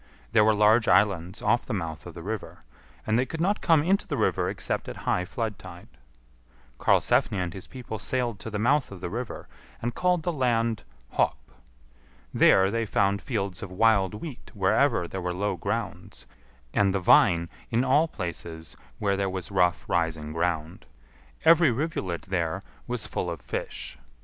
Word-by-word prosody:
There 110 Hz, -1 st, +5 dB
were 110 Hz, 0 st, +4 dB
large 110 Hz, +2 st, +4 dB
islands 95 Hz, -3 st, +2 dB
off 120 Hz, +3 st, +2 dB
the 120 Hz, -, -2 dB
mouth 80 Hz, -4 st, -5 dB
of -, -, -10 dB
the -, -, -8 dB
river, -, -, -6 dB, 0.4 s
and 110 Hz, +2 st, +2 dB
they 130 Hz, -, +2 dB
could 160 Hz, -, -6 dB
not 195 Hz, +5 st, +1 dB
come 160 Hz, -4 st, +4 dB
into 195 Hz, +4 st, +1 dB
the -, -, -2 dB
river -, -, +1 dB
except -, -, -3 dB
at -, -, -6 dB
high 90 Hz, -, +1 dB
flood 110 Hz, 0 st, -4 dB
tide. 90 Hz, -2 st, -11 dB, 0.9 s
Karlsefni 100 Hz, -, +3 dB
and 90 Hz, -2 st, -2 dB
his 95 Hz, -, -8 dB
people 120 Hz, -4 st, -7 dB
sailed 120 Hz, 0 st, -1 dB
to 115 Hz, -, -6 dB
the 105 Hz, -, -3 dB
mouth 130 Hz, +5 st, +2 dB
of 100 Hz, -, -8 dB
the 85 Hz, -, -5 dB
river, 120 Hz, +2 st, -5 dB, 0.3 s
and 120 Hz, +1 st, -3 dB
called 180 Hz, +1 st, +1 dB
the 175 Hz, -, -1 dB
land 115 Hz, -5 st, 0 dB, 0.3 s
Hop. -, -, +1 dB, 1.0 s
There 95 Hz, +1 st, +5 dB
they 115 Hz, +1 st, 0 dB
found 100 Hz, -1 st, +1 dB
fields 100 Hz, -6 st, -3 dB
of 95 Hz, -, -6 dB
wild 100 Hz, -1 st, +3 dB
wheat 135 Hz, +3 st, -8 dB
wherever 105 Hz, +1 st, +2 dB
there 95 Hz, +2 st, -5 dB
were 90 Hz, 0 st, -2 dB
low 100 Hz, +1 st, -1 dB
grounds; 85 Hz, -, -4 dB, 0.5 s
and 100 Hz, -1 st, +2 dB
the -, -, +2 dB
vine 85 Hz, -2 st, +5 dB, 0.2 s
in 120 Hz, +2 st, +2 dB
all 145 Hz, +5 st, +3 dB
places 85 Hz, -, -6 dB, 0.2 s
were 100 Hz, -1 st, +1 dB
there 95 Hz, 0 st, 0 dB
was 95 Hz, 0 st, -5 dB
rough 90 Hz, -2 st, +2 dB
rising 80 Hz, -3 st, -1 dB
ground. 85 Hz, 0 st, -2 dB, 0.6 s
Every 165 Hz, -1 st, +7 dB
rivulet 115 Hz, -, -2 dB
there 85 Hz, -4 st, -2 dB, 0.2 s
was -, -, -2 dB
full -, -, -3 dB
of -, -, -5 dB
fish. -, -, -5 dB
100 Hz, 175 wpm, -27 LUFS, 90-120 Hz, 1.0 s, Every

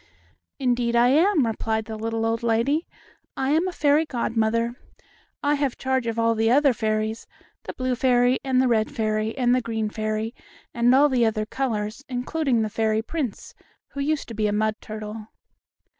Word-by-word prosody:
"Indeed 245 Hz, -3 st, 0 dB
I 240 Hz, +1 st, +5 dB
am," 320 Hz, +1 st, +4 dB
replied 220 Hz, -1 st, -2 dB
the 220 Hz, -, -6 dB
little 225 Hz, +1 st, -2 dB
old 225 Hz, 0 st, 0 dB
lady. 235 Hz, +8 st, +1 dB, 0.5 s
"I 265 Hz, +1 st, 0 dB
am 325 Hz, +4 st, +2 dB
a -, -, -2 dB
fairy 300 Hz, -2 st, +3 dB
godmother. 230 Hz, -4 st, 0 dB, 0.7 s
I 290 Hz, +1 st, +3 dB
have 280 Hz, -3 st, -1 dB
charge 260 Hz, -2 st, -1 dB
of 230 Hz, 0 st, -2 dB
all 230 Hz, 0 st, +3 dB
the 225 Hz, 0 st, +1 dB
other 275 Hz, +2 st, +4 dB
fairies, 220 Hz, 0 st, -2 dB, 0.4 s
the -, -, -5 dB
blue 255 Hz, 0 st, -1 dB
fairy 245 Hz, 0 st, +3 dB
and 260 Hz, -2 st, +1 dB
the 260 Hz, -, +3 dB
red 220 Hz, -3 st, +2 dB
fairy 215 Hz, -3 st, -2 dB
and 245 Hz, -2 st, +3 dB
the 255 Hz, -, +2 dB
green 220 Hz, -2 st, -3 dB
fairy, 215 Hz, +1 st, -2 dB, 0.4 s
and 240 Hz, +2 st, +4 dB
all 285 Hz, +2 st, +6 dB
the 255 Hz, -4 st, +2 dB
other 215 Hz, -1 st, -1 dB
colors, 225 Hz, -1 st, -3 dB
including 250 Hz, -1 st, 0 dB
the 215 Hz, -, -2 dB
fairy 220 Hz, 0 st, 0 dB
prince, 270 Hz, -4 st, -4 dB, 0.4 s
who 280 Hz, -, -8 dB
used 295 Hz, +1 st, -1 dB
to -, -, -6 dB
be 215 Hz, -1 st, 0 dB
a -, -, 0 dB
mud 215 Hz, +1 st, +1 dB
turtle." 215 Hz, 0 st, -7 dB
235 Hz, 180 wpm, -24 LUFS, 220-265 Hz, 0.7 s, all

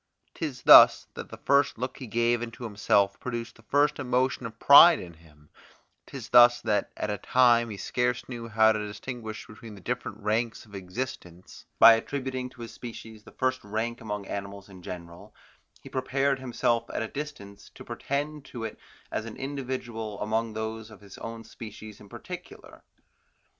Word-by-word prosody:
'Tis 145 Hz, -6 st, -5 dB
thus, -, -, +9 dB
that -, -, -8 dB
the -, -, -9 dB
first 140 Hz, -2 st, +2 dB
look 125 Hz, +3 st, -4 dB
he 130 Hz, -, -7 dB
gave 120 Hz, +1 st, +1 dB
into 120 Hz, +1 st, -7 dB
himself 100 Hz, -2 st, +1 dB
produced 120 Hz, -2 st, -5 dB
the -, -, -18 dB
first 145 Hz, +6 st, +1 dB
emotion 130 Hz, -1 st, 0 dB
of 115 Hz, 0 st, -13 dB
pride 160 Hz, +7 st, +9 dB
in 85 Hz, -1 st, -9 dB
him; 75 Hz, -2 st, -21 dB, 0.6 s
'tis -, -, -8 dB
thus 120 Hz, 0 st, +7 dB
that, 105 Hz, -2 st, 0 dB
at 105 Hz, -, -2 dB
a 105 Hz, -, -4 dB
time 120 Hz, -1 st, +3 dB
he 105 Hz, -, -7 dB
scarce 125 Hz, +3 st, -1 dB
knew 120 Hz, -2 st, -7 dB
how 110 Hz, 0 st, +4 dB
to 105 Hz, -1 st, -2 dB
distinguish 110 Hz, +1 st, -7 dB
between 110 Hz, 0 st, -12 dB
the -, -, -12 dB
different -, -, -4 dB
ranks 110 Hz, +2 st, -2 dB
of 105 Hz, -, -20 dB
existence, 95 Hz, -2 st, -7 dB
by 115 Hz, -, +9 dB
attributing 130 Hz, +1 st, -3 dB
to 125 Hz, -, -15 dB
his 115 Hz, -, -8 dB
species 110 Hz, -2 st, -10 dB
the -, -, -13 dB
first 130 Hz, 0 st, -1 dB
rank 110 Hz, +3 st, -3 dB
among 105 Hz, -2 st, -5 dB
animals 100 Hz, 0 st, -7 dB
in 95 Hz, -2 st, -13 dB
general, 85 Hz, -1 st, -10 dB, 0.5 s
he -, -, -11 dB
prepared 135 Hz, +1 st, 0 dB
himself 120 Hz, -2 st, -1 dB
at -, -, -2 dB
a -, -, -3 dB
distance 110 Hz, -8 st, -8 dB
to -, -, -14 dB
pretend 145 Hz, +1 st, -4 dB
to 120 Hz, -4 st, -8 dB
it 110 Hz, -, -6 dB, 0.3 s
as 110 Hz, -, -3 dB
an 115 Hz, -, -8 dB
individual 125 Hz, -6 st, -5 dB
among 110 Hz, +1 st, -1 dB
those 110 Hz, 0 st, -5 dB
of 110 Hz, -, -15 dB
his 100 Hz, -1 st, -13 dB
own 115 Hz, 0 st, -7 dB
species 110 Hz, -2 st, -11 dB
in 100 Hz, -, -15 dB
particular. -, -, -10 dB
115 Hz, 175 wpm, -27 LUFS, 105-125 Hz, 0.6 s, thus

